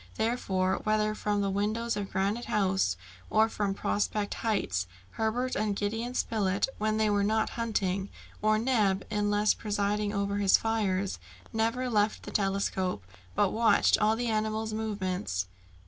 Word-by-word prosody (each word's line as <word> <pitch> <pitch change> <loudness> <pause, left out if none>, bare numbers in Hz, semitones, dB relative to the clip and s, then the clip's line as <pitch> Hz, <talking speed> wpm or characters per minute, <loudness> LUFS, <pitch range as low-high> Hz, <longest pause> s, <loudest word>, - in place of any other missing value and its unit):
Therefore, 195 -5 0
whether 215 0 +1
from 210 -1 -1
the 200 -1 0
windows 215 +4 -1
of 200 -1 -3
Granite 200 +5 -1
House, 190 - +1 0.3
or 220 +1 +4
from 205 -3 -2
Prospect 205 0 -1
Heights, 100 - -1 0.2
Herbert 240 +4 -1
and 210 -1 0
Gideon 225 +5 -2
Spilett, 200 -5 +1
when 215 0 +1
they 220 0 +2
were 205 -1 +2
not 220 +2 +1
hunting, 200 -4 -1 0.3
or 215 +1 +3
Neb 215 -5 +1
unless 210 0 +2
presiding 205 0 -1
over 200 0 -1
his 200 -2 +5
fires, 200 - -1 0.3
never 230 +3 0
left 215 -2 +1
the - - -7
telescope, 195 - 0 0.3
but - - +3
watched 225 0 +4
all 215 +1 +3
the 240 +2 -2
animal's 220 0 -1
movements. 185 - -2
210 Hz, 145 wpm, -29 LUFS, 195-220 Hz, 0.3 s, his